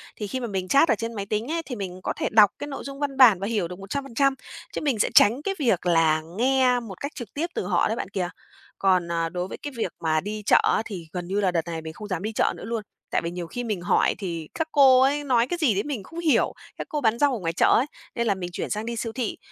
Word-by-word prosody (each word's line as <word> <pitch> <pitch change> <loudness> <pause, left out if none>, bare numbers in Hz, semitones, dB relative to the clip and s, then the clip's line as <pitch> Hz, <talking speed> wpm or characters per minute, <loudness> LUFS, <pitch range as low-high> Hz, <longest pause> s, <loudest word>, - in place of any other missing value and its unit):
thì 210 - -5
khi 260 - -3
mà 240 - -3
mình 190 -3 -3
chat 280 - +4
ở - - +4
trên 230 +2 -4
máy 200 -3 -4
tính 215 +7 -2
ấy, 335 0 -1
thì 250 - -5
mình 185 -3 -6
có - - -1
thể - - -1
đọc 210 -2 +7
cái 290 - -5
nội 275 - -6
dung 275 0 -8
văn 280 -2 -2
bản 235 -8 +7
và 195 - -3
hiểu 210 -6 0
được 180 +2 -9
100%, 275 +6 0 0.4
chứ - - -3
mình 270 -8 0
sẽ - - +2
tránh 235 +7 +6
cái 390 +5 -2
việc 230 - +1
là 165 -2 +3 0.2
nghe 255 0 +3
một 215 -6 -9
cách 280 - -3
trực 240 -7 -8
tiếp 320 +4 -1
từ - - -2
họ 180 -3 +2
đấy 220 - -1
bạn 190 - -4
kìa. 180 -3 -2 0.5
Còn, 185 -3 +2
à, 165 -1 0
đối 180 +1 -3
với - - -7
cái 290 - -7
việc 185 - -1
mà 155 -1 +1
đi 210 +1 -5
chợ - - +6
á - - +2
thì 180 -6 -7
gần 175 -1 -4
như 195 +2 -1
là 190 -3 +2
đợt 170 -2 +1
này 165 -1 -4
mình 160 0 -7
không 210 - -9
dám 185 -3 -3
đi 215 - -2
chợ - - +1
nữa - - -10
luôn, 225 -2 -3 0.3
tại - - +1
vì 170 0 -4
nhiều 175 -1 -5
khi 245 +9 -5
mình 210 -7 -3
hỏi 175 - +2
thì 170 -6 -5
các 320 -1 -2
cô 265 -3 +6
ấy 285 +2 +2
nói 245 -4 +2
cái 350 - -2
gì 280 -9 +3
đấy 200 - 0
mình 275 -9 -4
không 330 - -9
hiểu, 330 -3 +2 0.2
các - - -6
cô 300 -1 -2
bán 230 -1 +2
rau 285 -2 +3
ở - - -5
ngoài 165 -3 -2
chợ - - +3
ấy, 250 - +1 0.3
nên 235 -1 0
là 200 - +2
mình 180 -2 -5
chuyển - - -4
sang 215 +1 -2
đi 235 0 -3
siêu 230 0 -3
thị. 245 -3 -3
215 Hz, 300 wpm, -25 LUFS, 180-260 Hz, 0.5 s, đọc